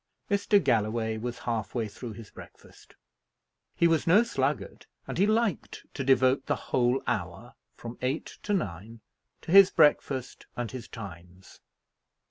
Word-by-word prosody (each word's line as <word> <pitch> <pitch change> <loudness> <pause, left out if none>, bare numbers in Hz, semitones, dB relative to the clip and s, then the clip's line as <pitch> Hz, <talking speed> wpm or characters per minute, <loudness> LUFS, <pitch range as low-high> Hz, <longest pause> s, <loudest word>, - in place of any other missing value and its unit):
Mr. 205 +1 +3
Galloway 110 -3 0
was 120 +2 -5
half 115 -3 -4
way 115 -3 -1
through 115 +2 -8
his 110 0 -12
breakfast. - - -16 0.8
He 170 - +4
was 165 -2 +1
no 195 +7 +6
sluggard; 235 - -3 0.2
and - - -6
he 200 - +4
liked 220 -4 -1
to 135 - -4
devote 130 0 +3
the - - +1
whole 125 +1 0
hour, - - -4 0.2
from 120 0 -9
eight 130 +4 -3
to 205 - -2
nine, 110 - -5 0.4
to - - -7
his 195 0 +9
breakfast 135 -3 +1
and 120 -2 -3
his 130 -2 -8
Times. 90 -3 -11
125 Hz, 145 wpm, -28 LUFS, 110-160 Hz, 0.8 s, his